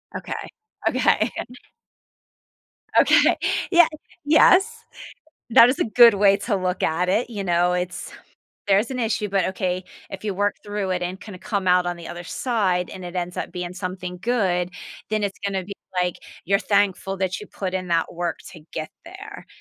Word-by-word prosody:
Okay. - - -5 0.6
Okay. - - +2 1.7
Okay. - - +5 0.3
Yeah 345 -2 +7 0.4
Yes. 360 +6 +4 0.7
That 230 +1 +8
is 255 - 0
a - - +2
good 235 0 +7
way 200 0 +4
to 210 0 -1
look 185 -1 -2
at 170 +3 +1
it. 225 +6 +1
You 205 -4 -4
know, 175 0 +2
it's 180 0 -4 0.6
there's 205 +5 +3
an 255 - -3
issue, 220 -2 -1
but 195 -1 +1
okay. 185 -1 -2 0.3
If 195 +1 -8
you 210 -2 -2
work 205 +2 0
through 205 -2 -3
it 180 -1 -1
and 180 +2 -4
kinda 205 -3 -10
come 200 -2 -2
out 180 0 +4
on 175 - -2
the 170 - -9
other 175 0 -7
side, 185 -4 -1
and 185 - -9
it 175 +1 -8
ends 180 0 -3
up - - -4
being 180 0 -5
something 180 -1 -5
good, 185 -7 0 0.4
then 215 -1 0
it's 200 -1 -3
gonna 195 -2 -1
be, 200 - -7 0.3
like, 180 -1 -1 0.3
you're 200 +3 +2
thankful 200 -1 +1
that 190 -1 -2
you 210 - -10
put 185 -2 -5
in 185 -1 -3
that 170 0 0
work 170 -1 -3
to 170 - -12
get 155 - -4 0.2
there. 400 +4 -11
190 Hz, 175 wpm, -23 LUFS, 180-210 Hz, 1.7 s, That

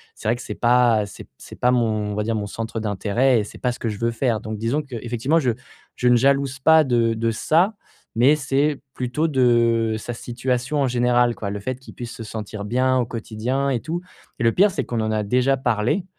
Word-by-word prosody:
C'est - - -7
vrai 115 - +3
que 120 - -9
c'est - - -6
pas, 120 -3 +3
c'est 100 - -11
p - - -23
c'est - - -12
pas 125 - +2
mon 110 -4 0
on - - -4
va 105 - -1
dire 115 +1 -1
mon 105 -1 -3
centre 115 +1 -5
d'intérêt 110 +5 +1
et 105 - -1
c'est - - -12
pas 125 - 0
ce 120 - -8
que 115 - -3
je 105 - -3
veux 115 +2 0
faire, 115 -2 0
donc 110 0 -5
disons 115 +8 -1
qu'effectivement, 125 +3 -1
je 130 -6 +1 0.4
je 125 - +2
ne 120 - +5
jalouse 140 +1 +1
pas 160 +3 +6
de 120 -4 +2
de 115 0 0
ça, 170 - +2 0.4
mais 130 +6 +5
c'est 140 0 0
plutôt 125 +6 -1
de 115 -4 +2
sa 120 +3 -6
situation 125 +3 -2
en 135 - +2
général, 120 -1 +2
quoi. 100 - -4
Le 105 - -4
fait 130 +4 -4
qu'il 130 - -13
puisse 120 -2 -7
se 120 -2 -8
sentir 105 -1 -6
bien 130 +4 +1
au 125 - +1
quotidien 120 +4 -2
et 130 -3 0
tout, 170 +2 -4 0.4
et - - -1
le 115 - +4
pire, 195 - +4
c'est - - -2
qu'on 120 -2 -3
en 110 0 -1
a 110 -1 0
déjà 125 +6 +2
parlé, 125 - 0
120 Hz, 235 wpm, -22 LUFS, 110-130 Hz, 0.4 s, pas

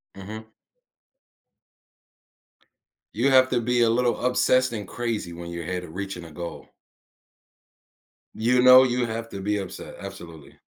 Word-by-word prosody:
Mhm. 110 +3 -9 2.7
You 140 - +1
have 130 -1 +6
to 120 -2 0
be 120 +1 +1
a 115 - +4
little 120 +1 0
obsessed 130 0 +2
and 105 -4 -5
crazy 115 -8 -4
when 85 0 -8
you're 85 -1 -6
ahead 90 +1 -4
of 80 -1 -11
reaching 95 -3 -5
a 80 - -12
goal. 85 +2 -8 1.7
You 125 +3 +2
know, 130 +1 +9
you 125 -1 0
have 115 0 -5
to 100 - -7
be 105 +1 -1
upset, 95 -2 -7
absolutely. 80 -4 -11
110 Hz, 140 wpm, -24 LUFS, 90-125 Hz, 2.7 s, know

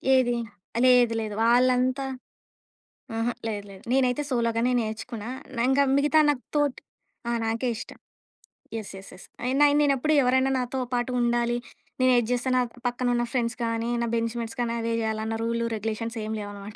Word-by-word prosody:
ఏది? 245 -2 +3 0.5
లేదు. 245 -2 +5
లేదు. 215 -1 -4
వాళ్ళంతా 255 +2 +3 1.1
ఆహా! 230 +2 0
లేదు 205 -2 -3
లేదు. 190 - -12
నేనైతే 260 +1 +2
సోలోగానే 235 0 +1
నేర్చుకున్నా. 220 +1 -5 0.4
ఇంగా 275 +1 +4
మిగతా 295 +2 +3
నా 295 - +4 0.2
తోట్ 290 -3 +1 0.5
ఆహ్, 235 0 0
నాకే 230 +3 -1
ఇష్టం. - - -9 0.8
యెస్. 220 -3 -5
యెస్. 190 - -12
యెస్. 185 - -13 0.2
అయిన 275 +4 +4
నే‌నేప్పుడు 290 +1 +2
ఎవరైనా 260 +1 +3
నాతో 255 +1 -2
పాటు 245 +1 0
ఉండాలి. 240 0 +1 0.4
నేను 255 0 +5
ఏది 230 -2 +1
చేస్తే 245 +1 0
నా 250 - +4 0.3
పక్కన 245 +1 -1
ఉన్న 240 0 +1
ఫ్రెండ్స్ 240 -2 0
గానీ 230 0 -1
నా 235 - 0
బెంచ్‌మేట్స్ 230 +1 -3
కానీ 235 -1 0
అవే 230 0 -2
జేయాలన్న 220 0 -2
రూల్ 230 0 -1
రెగ్యులేషన్స్ 225 +2 -3
ఏం 215 - -4
లేవనమాట. 205 0 -8
240 Hz, 155 wpm, -26 LUFS, 225-255 Hz, 1.1 s, లేదు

